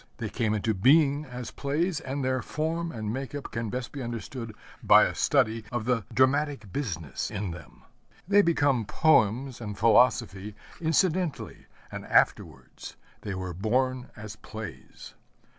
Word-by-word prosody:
They 110 -3 -4
came 110 -2 -1
into 110 +1 0
being 145 - +4
as 125 -2 -7
plays, 155 +4 -1
and 135 -2 -4
their 130 0 0
form 165 +2 -3
and 110 -4 -4
make 135 +2 -5
up 145 - -6
can 115 -1 -3
best 125 0 -4
be 140 - -6
understood 115 -1 -6 0.3
by - - +7
a - - 0
study 110 0 +1
of 120 -3 -3
the 120 -4 0
dramatic 130 -5 +1
business 85 - -3
in 100 -3 -4
them. 85 - -12 0.4
They 205 +1 +6
become 145 - +2
poems 125 -1 +2
and 105 -3 -6
philosophy 110 -3 +3 0.3
incidentally, 170 0 0 0.2
and - - -6
afterwards: 70 -6 0 0.3
they 100 - -5
were 95 -1 -5
born 125 +7 -1
as 105 0 -9
plays. 110 -13 -10
125 Hz, 145 wpm, -27 LUFS, 105-145 Hz, 0.4 s, by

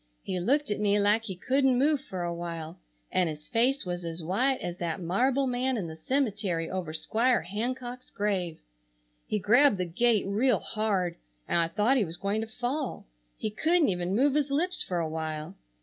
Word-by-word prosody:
He 185 - -2
looked 275 +8 +1
at 205 - -1
me 205 0 +3
like 210 +2 +3
he 190 -4 -4
couldn't 265 +6 +2
move 285 +1 +3
for 185 -8 -5
a 170 0 -2
while 170 -1 -6 0.3
and 180 -3 +2
his 150 0 -7
face 250 +2 +2
was 175 0 -3
as 165 0 -5
white 250 +11 +1
as 175 0 -5
that 170 -1 -2
marble 250 +11 +1
man 255 0 0
in 195 - -2
the 160 -1 -7
cemetery 200 - -1
over 185 -4 -3
Squire 225 +10 +1
Hancock's 245 +6 -4
grave. 190 -5 -1 0.7
He 215 - 0
grabbed 225 +4 +5
the 180 - -1
gate 215 +5 +2
real 215 +4 +2
hard 200 -6 -1 0.3
and - - +2
I 165 - +3
thought 210 +10 +2
he 235 - +3
was 165 0 -6
going 200 +3 -1
to 225 - -4
fall. 250 +5 -3 0.3
He 215 - -3
couldn't 325 +6 +3
even 180 0 -1
move 270 +4 +3
his 295 -1 +1
lips 345 +6 0
for 180 - -2
a 165 -2 0
while. 155 +2 -4
205 Hz, 195 wpm, -28 LUFS, 175-255 Hz, 0.7 s, grabbed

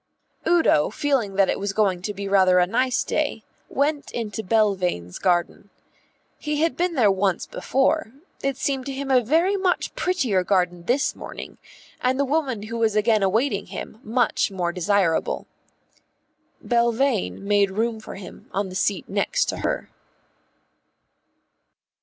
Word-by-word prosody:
Udo, 330 - +4
feeling 235 -5 0
that 195 -1 +4
it - - -1
was 200 0 -2
going 195 -4 +1
to 210 - -3
be 200 -1 -5
rather 190 -2 +4
a 180 - +5
nice 255 +6 +1
day, 290 -8 -2 0.3
went 285 +1 0
into 220 -2 -3
Belvane's 185 - 0
garden. 180 +2 0 0.7
He 300 0 -2
had 330 0 +1
been 350 -1 0
there 220 -7 +4
once 190 -2 0
before; 270 -1 0 0.3
it 275 -1 -1
seemed 270 -1 -2
to 275 - -3
him 270 0 -3
a 255 -1 +5
very 330 - +2
much 375 -2 0
prettier 260 - 0
garden 180 -2 0
this 265 +7 +1
morning, - - -9 0.4
and 255 +2 +1
the 280 - +3
woman 270 -7 -1
who 230 +2 -5
was 220 -2 +2
again 215 0 +3
awaiting 205 +1 +1
him 215 - -8
much 235 0 +1
more 180 -3 -2
desirable. 190 - +1 1.2
Belvane 235 -2 +1
made 200 -1 +3
room 220 +3 -1
for 220 - -9
him 195 - -11
on 195 0 -2
the - - -9
seat 195 +1 -1
next 210 - 0
to - - -2
her. - - -2
220 Hz, 150 wpm, -23 LUFS, 195-270 Hz, 1.2 s, a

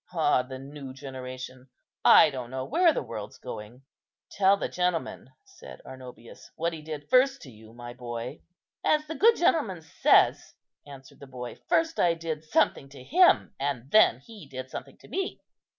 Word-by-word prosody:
Ah, 150 -6 +2
the 130 +1 -8
new 135 0 -9
generation! 130 -1 -9 0.3
I 155 - +7
don't 125 -3 -6
know 130 0 -4
where 340 +2 +4
the - - -3
world's - - -8
going." 110 +5 -9 0.5
"Tell 195 0 +3
the - - -3
gentleman," 180 -2 -2 0.2
said 390 -2 -13
Arnobius, 125 -3 -12
"what 170 +1 -2
he 160 - -8
did 150 -1 -7
first 265 +1 +3
to 135 - -11
you, 110 0 -16
my 120 +1 -9
boy." 120 -1 -7 0.4
"As 305 0 +2
the 315 - -6
good 455 +7 +5
gentleman 220 - +1
says," 160 - +2 0.3
answered 135 -2 -13
the 140 - -12
boy, 125 -2 -8
"first 325 0 +1
I 170 -1 +3
did 160 -2 -5
something 145 -3 +1
to 135 -2 -13
him, 355 - +4
and 135 -2 -3
then 135 - +5
he 205 -1 -13
did 130 -1 -8
something - - -8
to - - -18
me." 385 0 -3
140 Hz, 170 wpm, -27 LUFS, 130-190 Hz, 0.5 s, I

